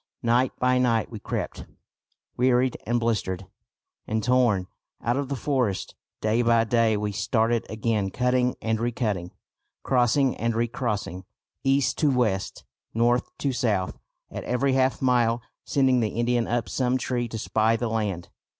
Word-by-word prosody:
Night 120 +2 +3
by 125 0 +2
night 115 -3 +1
we 110 - -6
crept, - - -4 0.7
wearied 125 0 +2
and 120 +1 +2
blistered 100 -5 -1 0.6
and 110 0 -1
torn, 120 -7 +3 0.4
out 120 +1 +1
of 140 -1 -2
the 140 - -1
forest. 125 -8 -1 0.3
Day 110 +2 +2
by 115 -1 +4
day 115 -1 +2
we 105 0 -2
started 115 +2 0
again 110 -2 -1
cutting 125 +3 +1
and 110 0 0
recutting, 110 -7 -1 0.5
crossing 130 +1 +2
and 115 0 -1
recrossing, 110 -6 -2 0.4
east 135 -1 +2
to 150 - +3
west, 115 -8 0 0.3
north 120 +2 +2
to 140 -2 -1
south, 105 -7 -1 0.3
at - - -5
every 130 +2 +1
half 130 0 +1
mile 120 -2 +2 0.2
sending 130 -2 +3
the 110 -2 +1
Indian 120 0 +1
up 120 0 -1
some 130 -1 0
tree 120 -1 -2
to 115 - -6
spy 110 +1 +1
the 120 +1 -1
land. 105 -6 -2
120 Hz, 150 wpm, -25 LUFS, 110-125 Hz, 0.7 s, by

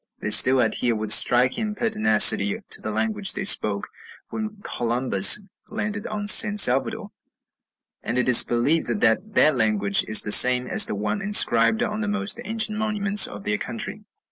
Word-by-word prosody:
They 105 - -5
still 130 +4 +4
adhere 115 +1 -2
with 110 -1 -5
striking 130 - +2
pertinacity 210 - +2
to - - -2
the - - -6
language 110 - -2
they - - -6
spoke 105 - +1 0.4
when 215 -1 -8
Columbus 120 - +1 0.3
landed 210 -1 -6
on 205 -1 -7
San 210 0 +5
Salvador; 205 - +1 0.9
and 120 - -5
it 125 - -2
is 125 -2 +6
believed 140 +7 -2
that 185 - -2
that 155 -2 +2
language 105 -4 0
is 110 - +3
the 105 - -5
same 125 +2 +4
as - - +1
the - - -6
one 105 - -5
inscribed 115 - +1
on 210 +1 -6
the 210 - -3
most 210 +2 -4
ancient 220 -2 -3
monuments 210 -2 0
of - - -12
their 210 0 -4
country. 220 -2 -4
145 Hz, 165 wpm, -20 LUFS, -, 0.9 s, is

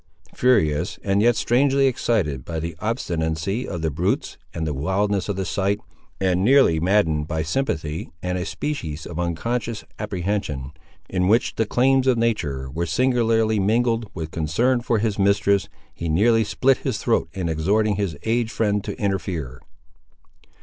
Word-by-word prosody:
Furious, 100 -13 +2
and 100 0 +2
yet 120 +1 +4
strangely 135 +4 +3
excited 100 - 0
by 80 +3 -4
the 85 0 -4
obstinacy 95 -1 -2
of 85 -3 -5
the 80 - 0
brutes 85 +6 -1 0.2
and 80 - -3
the 75 - -2
wildness 95 +8 0
of 100 - -1
the 95 0 -2
sight, 100 +4 0 0.4
and 95 -1 +1
nearly 130 - +5
maddened 80 -4 +2
by 80 -1 -1
sympathy 80 - -2
and 90 +1 -2
a 90 - -2
species 85 - -4
of 85 0 -6
unconscious 115 +6 -2 0.2
apprehension, 90 -9 -3 0.4
in 90 -1 0
which 115 +5 +3
the 110 - -1
claims 130 +3 +3
of 130 -2 +4
nature 75 -13 -1
were 85 +4 -2
singularly 115 0 +2
mingled 115 +2 +1
with 80 -2 -5
concern 115 +11 +1
for 120 -1 +1
his 105 -1 -1
mistress, 100 0 +2 0.2
he 85 - -4
nearly 110 +8 +4
split 125 +5 +2
his - - -2
throat - - 0
in 95 -3 -3
exhorting 100 +7 +1
his 95 -7 -2
aged 115 0 0
friend 105 -2 0
to - - -6
interfere. 85 - -3
100 Hz, 155 wpm, -23 LUFS, 80-115 Hz, 0.4 s, nearly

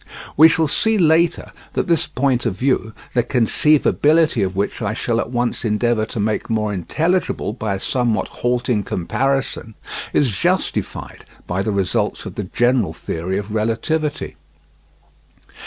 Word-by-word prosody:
We 160 +3 +8
shall 160 -1 +2
see 220 +9 +2
later 165 -1 +2 0.2
that - - 0
this 170 -2 +1
point 130 -4 0
of 95 -5 -3
view, 130 -4 0 0.2
the 125 - +3
conceivability 150 +4 +3
of 95 0 -2
which 100 +4 -2
I 105 -1 -1
shall 115 +1 -1
at - - -2
once 120 -1 -1
endeavour 110 0 +1
to 115 - -5
make 105 +3 -1
more 105 -2 0
intelligible 160 - -1
by 110 -4 -2
a - - -5
somewhat 120 0 0
halting 120 -2 0
comparison, 130 +3 -2 0.4
is 125 -8 +2
justified - - -2 0.2
by 90 +2 -2
the 105 - -1
results 100 -3 -1
of - - -6
the 105 - -4
general 120 +2 +1
theory 90 +4 -3
of 105 +1 -5
relativity. 115 +8 -1
120 Hz, 145 wpm, -20 LUFS, 105-140 Hz, 0.4 s, We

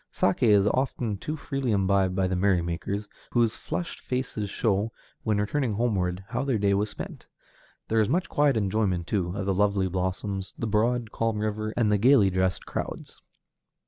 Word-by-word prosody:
Saké 100 +5 +2
is 100 -2 +5
often 120 -2 0
too 150 +10 -4
freely 135 -3 -2
imbibed 95 -2 +2
by 95 -1 +2
the 90 - -1
merrymakers, 95 +2 0 0.3
whose 115 -2 +3
flushed 175 - -4
faces 125 -5 -3
show, 105 +1 0 0.3
when 110 -2 0
returning 115 +3 0
homeward, 95 -5 0
how 120 +3 -1
their 135 -4 +1
day 100 -1 +2
was 105 +2 +1
spent. - - -8 0.6
There 110 0 +3
is 105 - +1
much 175 +6 +1
quiet 145 -4 +2
enjoyment, 95 -4 0
too, 90 -1 -1
of 100 - -2
the 95 - +1
lovely 100 0 +2
blossoms, 95 +1 -3
the - - -2
broad, 115 +2 +1
calm 115 -1 -1
river, 110 0 -2
and 110 -3 +3
the 105 - +3
gayly 115 -4 +5
dressed 95 0 0
crowds. - - -6
105 Hz, 175 wpm, -27 LUFS, 95-115 Hz, 0.6 s, is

